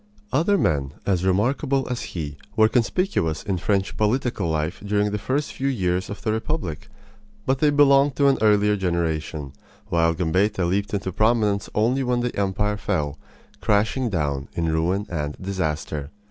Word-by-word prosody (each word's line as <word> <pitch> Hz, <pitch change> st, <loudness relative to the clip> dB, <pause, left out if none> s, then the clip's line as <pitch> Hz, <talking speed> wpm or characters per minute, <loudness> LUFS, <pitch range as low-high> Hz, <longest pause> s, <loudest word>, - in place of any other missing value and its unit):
Other 170 Hz, +9 st, +3 dB
men 70 Hz, -, 0 dB
as 95 Hz, -3 st, +1 dB
remarkable 125 Hz, +8 st, +1 dB
as 125 Hz, -1 st, -3 dB, 0.2 s
he 75 Hz, -3 st, -4 dB, 0.2 s
were 110 Hz, -1 st, +6 dB
conspicuous 115 Hz, -, 0 dB
in 95 Hz, -4 st, -2 dB
French 100 Hz, 0 st, 0 dB
political 110 Hz, -4 st, 0 dB
life 80 Hz, +3 st, -2 dB
during 105 Hz, 0 st, +1 dB
the 105 Hz, -, -2 dB
first 135 Hz, +8 st, -1 dB
few 135 Hz, -, -2 dB
years 95 Hz, -8 st, 0 dB
of 105 Hz, -, -7 dB
the 110 Hz, -, +1 dB
republic; 110 Hz, -, -3 dB, 0.6 s
but 130 Hz, 0 st, +1 dB
they 150 Hz, -, +4 dB
belonged 140 Hz, -1 st, +5 dB
to 140 Hz, -, +2 dB
an 135 Hz, -, +3 dB
earlier 105 Hz, -1 st, +4 dB
generation, 80 Hz, -6 st, -2 dB, 0.4 s
while 85 Hz, -1 st, +2 dB
Gambetta 95 Hz, +3 st, +1 dB
leaped 100 Hz, +4 st, 0 dB
into 95 Hz, -2 st, -2 dB
prominence 110 Hz, -1 st, +1 dB
only 120 Hz, +5 st, +2 dB
when 125 Hz, -1 st, 0 dB
the 120 Hz, 0 st, -2 dB
empire 100 Hz, +1 st, 0 dB
fell, 75 Hz, -7 st, -2 dB, 0.4 s
crashing 110 Hz, +5 st, +1 dB
down 70 Hz, -7 st, -1 dB
in 85 Hz, -1 st, 0 dB
ruin 90 Hz, +6 st, 0 dB
and 75 Hz, -3 st, -4 dB
disaster. 75 Hz, -6 st, -3 dB
100 Hz, 160 wpm, -23 LUFS, 85-120 Hz, 0.6 s, were